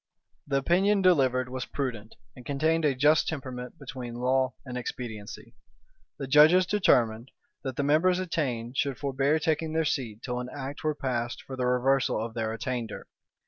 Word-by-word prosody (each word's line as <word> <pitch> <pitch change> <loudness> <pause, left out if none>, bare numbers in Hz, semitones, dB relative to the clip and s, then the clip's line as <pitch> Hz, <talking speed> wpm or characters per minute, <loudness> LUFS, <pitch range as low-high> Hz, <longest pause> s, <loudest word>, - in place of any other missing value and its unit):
The 140 -1 +1
opinion 190 +8 +2
delivered 130 -8 +3
was 130 0 -4
prudent, 115 -6 -5 0.2
and 125 - -12
contained 155 +4 +1
a 140 -3 +2
just 150 +4 +4
temperament 130 -2 -5
between 125 -7 -7
law 130 +1 +1
and 125 -1 -6
expediency.[] 115 -2 -6 0.6
The 140 - -4
judges 155 +7 +6
determined, 125 - +2 0.3
that 130 -2 -4
the 145 - -1
members 160 +6 +3
attainted 130 -9 -2
should 140 -3 0
forbear 140 +2 +1
taking 160 0 -1
their 160 0 +1
seat 115 -6 -2
till 125 -1 -3
an 125 0 -5
act 140 0 -6
were 155 -1 0
passed 120 -4 -3
for 135 - -7
the 125 -1 -1
reversal 125 0 +2
of 115 +1 -4
their 110 -1 -2
attainder. 115 0 -4
130 Hz, 165 wpm, -28 LUFS, 125-150 Hz, 0.6 s, judges